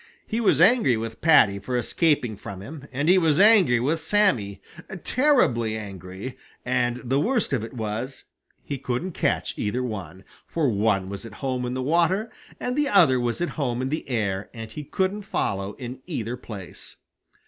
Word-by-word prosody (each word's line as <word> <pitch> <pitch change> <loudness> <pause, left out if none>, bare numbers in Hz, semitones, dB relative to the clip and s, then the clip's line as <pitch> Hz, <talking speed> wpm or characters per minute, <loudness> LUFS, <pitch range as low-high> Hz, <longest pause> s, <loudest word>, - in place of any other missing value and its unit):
He 225 +2 -2
was 175 - +3
angry 195 - +5
with 115 0 -6
Paddy 100 -11 +5
for 125 +6 -2
escaping 125 -1 +1
from 95 -1 -8
him, 140 +3 -9
and 140 +4 -1
he 185 +2 +6
was 160 -3 +2
angry 195 - +6
with 150 +7 0
Sammy, 150 - +1 0.4
terribly 155 - +2
angry, 95 +3 -8 0.3
and 125 -1 +1
the 130 +3 +1
worst 230 - 0
of 120 -5 0
it 115 - -7
was 115 +4 -4 0.4
he 140 - -5
couldn't 130 +8 -2
catch - - -1
either 120 +5 -1
one, 95 -6 -6 0.2
for 155 -5 0
one 100 -3 +1
was 100 +2 -6
at 115 -2 -10
home 125 -2 -1
in 125 - -3
the 130 - -2
water 170 - +1 0.3
and 250 - -2
the 295 0 +1
other 165 - +5
was 120 +4 -2
at 175 - 0
home 120 -3 -1
in 130 +1 -1
the 155 -1 -4
air 100 -5 -1
and 110 -1 -7
he 150 - -6
couldn't 190 +7 -1
follow 100 - -2
in 125 +1 -8
either 120 - -3
place. 100 -8 -9
125 Hz, 180 wpm, -25 LUFS, 110-165 Hz, 0.4 s, he